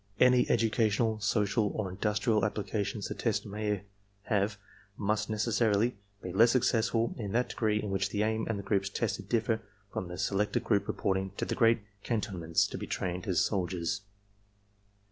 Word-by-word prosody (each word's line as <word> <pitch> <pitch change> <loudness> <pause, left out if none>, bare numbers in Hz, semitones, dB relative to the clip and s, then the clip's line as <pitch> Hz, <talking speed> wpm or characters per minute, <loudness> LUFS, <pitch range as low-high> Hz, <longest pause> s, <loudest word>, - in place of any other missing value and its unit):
Any 125 -1 +5
educational, 110 -1 +2
social 105 +1 +1
or 100 -4 -2
industrial 105 +3 +1
applications 105 -1 -2
the - - -3
tests - - -1
may 105 -1 -2 0.4
have 100 0 0 0.4
must 105 +1 0
necessarily 110 +1 +2 0.3
be 90 - -5
less 115 +5 +6
successful 115 -2 +2
in 105 -3 -4
that 125 +2 +1
degree 105 -2 +1
in 105 -2 -3
which 95 0 0
the 105 +1 0
aim 110 +1 0
and 110 - 0
the 100 - -5
groups 100 0 0
tested 100 -2 -2
differ 115 -1 +1 0.3
from 90 - -3
the 90 0 -7
selected 105 +4 0
group 100 -3 +1
reporting 95 0 -1
to - - -1
the - - -2
great 115 -1 +4 0.2
cantonments 95 -8 0
to - - -5
be - - -5
trained 90 +1 -3
as 90 -4 +2
soldiers. 95 0 -1
105 Hz, 165 wpm, -30 LUFS, 100-115 Hz, 0.4 s, less